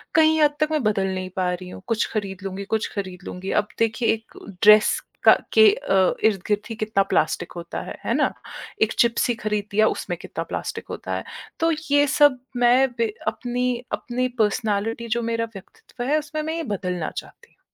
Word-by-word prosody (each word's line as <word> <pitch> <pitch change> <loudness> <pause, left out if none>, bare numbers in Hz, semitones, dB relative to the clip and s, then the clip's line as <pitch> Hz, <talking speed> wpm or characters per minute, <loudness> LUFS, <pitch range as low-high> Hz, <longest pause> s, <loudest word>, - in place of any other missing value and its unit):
कहीं 315 0 +5
हद 295 -1 +4
तक 305 - +2
मैं 305 -3 0
बदल 200 -3 +1
नहीं 185 0 -4
पा 180 -1 +1
रही 180 0 -7
हूँ, 185 - -10
"कुछ 230 -1 +1
खरीद 200 -3 -3
लूँगी, 195 +1 -4
कुछ 220 - -1
खरीद 190 -2 -5
लूँगी।" 185 +2 -5
अब 210 - -20
देखिए 230 +1 +1
एक 225 0 -9 0.3
ड्रेस 210 0 +7 0.2
का - - +9 0.2
के - - +6
अ, 195 - +2
इर्द-गिर्द 210 0 +1
ही 225 - -4
कितना 215 -2 +1
प्लास्टिक 165 +2 +1
होता 170 0 -5
है, - - -8
है - - +1
ना? - - +2 0.5
एक 220 - +3
चिप्स 235 +1 +3
ही - - +3
खरीद 210 -1 -1
दिया, 215 +2 +4
उसमें - - -3
कितना - - -5
प्लास्टिक - - -4
होता - - -4
है। - - -3 0.4
तो 330 0 +3 0.2
ये 290 0 +5
सब 290 -2 +4 0.2
मैं 245 +2 +5
बे 230 -2 0
अपनी 250 0 -1 0.3
अपनी 255 +1 -1 0.2
पर्सनैलिटी 215 +2 -1
जो - - 0
मेरा 230 0 0
व्यक्तित्व 245 +5 -10
है, 295 +4 +2
उसमें 305 0 -5
मैं 320 +1 -3
ये 330 - -2
बदलना 180 -4 -3
चाहती 470 - -9
हूँ। - - -39
220 Hz, 195 wpm, -23 LUFS, 195-255 Hz, 0.5 s, का